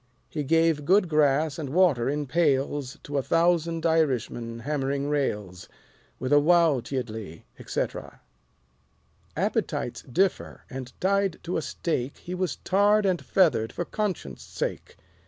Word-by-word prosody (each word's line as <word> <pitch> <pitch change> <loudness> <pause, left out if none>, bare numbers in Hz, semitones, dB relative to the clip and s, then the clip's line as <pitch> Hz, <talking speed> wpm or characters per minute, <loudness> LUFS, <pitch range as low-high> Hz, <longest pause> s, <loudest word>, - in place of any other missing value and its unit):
He 150 - -2
gave 165 0 +2
good 185 +5 +4
grass 150 0 +2
and 145 -4 -4
water 150 -7 +3
in 145 +1 -1
pails 140 -2 0
To 145 -1 -2
a - - 0
thousand 165 +1 +1
Irishmen 130 -7 0
hammering 140 +1 -1
rails. 105 -11 -2 0.5
With 130 +3 -1
a - - +7
wowtyiddly, 130 - +1 0.2
etc. - - -4 1.2
Appetites - - -1
differ; 185 +9 -1
and 130 -1 -6
tied 195 -1 +1
to 175 +2 -3
a - - 0
stake 140 -1 -3
He 180 - -7
was 180 -4 -1
tarred 205 +2 +3
and 185 -3 +1
feathered 135 - +2
for 175 - -4
Conscience' 185 - -3
Sake. - - -5
150 Hz, 130 wpm, -26 LUFS, 130-175 Hz, 1.2 s, a